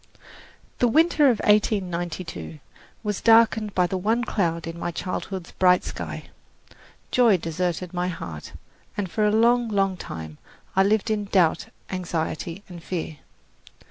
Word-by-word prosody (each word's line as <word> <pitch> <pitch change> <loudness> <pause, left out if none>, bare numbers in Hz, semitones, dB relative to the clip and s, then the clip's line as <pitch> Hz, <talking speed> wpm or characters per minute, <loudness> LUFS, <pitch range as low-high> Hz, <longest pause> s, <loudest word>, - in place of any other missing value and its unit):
CHAPTER - - -30
XIV - - -22
The 245 - +4
winter 315 +4 +3
of 235 - +1
1892 175 - 0 0.4
was 210 -2 -2
darkened 225 -2 +4
by 180 - +4
the 185 +1 -2
one 225 +5 +1
cloud 170 -8 -1
in 165 +1 -6
my 175 - -2
childhood's 180 +1 -5
bright 180 -1 +4
sky. - - -6 0.8
Joy 235 -6 +5
deserted 175 +2 -3
my 180 0 -1
heart, 85 - -7 0.4
and 195 -4 -3
for 215 - 0
a - - +2
long, 235 +2 +3
long 195 -3 +1
time 80 - -8 0.4
I 190 - +5
lived 210 +2 +2
in 210 -1 -1
doubt, 185 -5 +2 0.2
anxiety 170 0 -3
and 175 -2 -10
fear. 165 -3 -4
185 Hz, 145 wpm, -24 LUFS, 170-215 Hz, 0.8 s, Joy